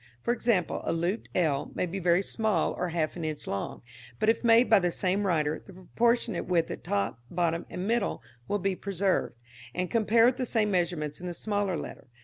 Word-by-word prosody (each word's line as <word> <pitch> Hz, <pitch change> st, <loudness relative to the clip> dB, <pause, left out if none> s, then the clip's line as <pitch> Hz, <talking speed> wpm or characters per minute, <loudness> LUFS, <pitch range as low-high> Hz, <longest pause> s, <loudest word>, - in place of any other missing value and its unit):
For 240 Hz, -, +2 dB
example, 230 Hz, -7 st, 0 dB
a -, -, -1 dB
looped 175 Hz, +6 st, -1 dB
l 150 Hz, -6 st, +1 dB
may -, -, 0 dB
be 185 Hz, +3 st, -4 dB
very 175 Hz, +1 st, +3 dB
small 215 Hz, -6 st, 0 dB
or 180 Hz, -, -2 dB
half 160 Hz, -2 st, -1 dB
an 170 Hz, -, -5 dB
inch 155 Hz, -1 st, -4 dB
long; 100 Hz, +4 st, -4 dB, 0.3 s
but, 215 Hz, -, +2 dB
if 225 Hz, -, +2 dB
made 235 Hz, +1 st, +6 dB
by 220 Hz, -, +6 dB
the 175 Hz, -1 st, +1 dB
same 190 Hz, +3 st, 0 dB
writer, 155 Hz, -3 st, +1 dB
the 195 Hz, -, -14 dB
proportionate 230 Hz, +3 st, 0 dB
width 170 Hz, -2 st, +1 dB
at -, -, -7 dB
top, 100 Hz, +3 st, -1 dB
bottom 170 Hz, -1 st, -1 dB
and 180 Hz, -, -4 dB
middle 230 Hz, -2 st, 0 dB, 0.2 s
will 205 Hz, -, +1 dB
be 195 Hz, -1 st, -1 dB
preserved, 195 Hz, -6 st, -1 dB, 0.4 s
and 180 Hz, -1 st, -2 dB
compare 225 Hz, 0 st, +4 dB
with 250 Hz, +1 st, +3 dB
the 255 Hz, -, -1 dB
same 215 Hz, -3 st, +1 dB
measurements 170 Hz, -5 st, -1 dB
in 180 Hz, -, -5 dB
the 175 Hz, -, -4 dB
smaller 205 Hz, -3 st, -1 dB
letter. -, -, -8 dB
185 Hz, 205 wpm, -28 LUFS, 170-215 Hz, 0.4 s, made